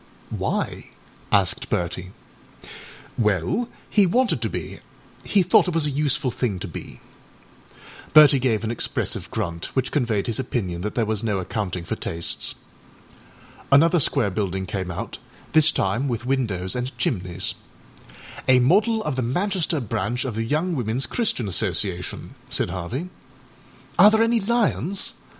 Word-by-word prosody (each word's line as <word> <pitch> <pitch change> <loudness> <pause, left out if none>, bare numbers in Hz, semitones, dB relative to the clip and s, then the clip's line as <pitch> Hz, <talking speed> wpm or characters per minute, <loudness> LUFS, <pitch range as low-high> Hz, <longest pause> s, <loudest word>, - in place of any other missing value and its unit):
â - - -4
âWhy?â - - -2 0.5
asked - - +1
Bertie. 90 +1 -2 1.1
âWell, 105 - +1 0.2
he 205 -3 +4
wanted 250 +8 +1
to - - -1
be; - - -6 0.5
he 200 -3 +3
thought 180 - +4
it 180 - -2
was 165 -2 +3
a 145 - 0
useful 145 -1 +1
thing 115 -5 -2
to 95 - -5
be.â 65 -6 -14 0.3
Bertie 150 -2 +8
gave 115 -4 0
an 110 - -1
expressive 120 - -2
grunt, 85 -6 -3
which 130 -1 0
conveyed 115 -8 0
his 115 0 -1
opinion 95 -9 -2
that 105 +3 -4
there 115 - +1
was 110 0 -2
no 105 -3 0
accounting 90 -1 -3
for - - -3
tastes. 85 0 -1 1.2
Another 165 +5 +6
square 110 -7 +2
building 95 -1 -2
came 95 -1 -4
out, 90 - -6 0.3
this 155 -1 +6
time 115 +8 0
with 120 -2 -3
windows 110 -9 0
and 125 +1 -4
chimneys. 90 -5 -1 1.0
âA 130 -1 +7
model 215 - +3
of 150 - -2
the 130 - -1
Manchester 175 - 0
branch 120 +1 -2
of 130 - -3
the 115 +1 -2
Young 160 +7 0
Womenâs 120 0 -1
Christian 225 - 0
Association,â 90 -1 -1 0.2
said - - +1
Harvey. 105 - -4 0.9
âAre 200 +3 +10
there 220 +1 +4
any 230 0 +2
lions? 205 -3 0
120 Hz, 150 wpm, -23 LUFS, 95-155 Hz, 1.2 s, âAre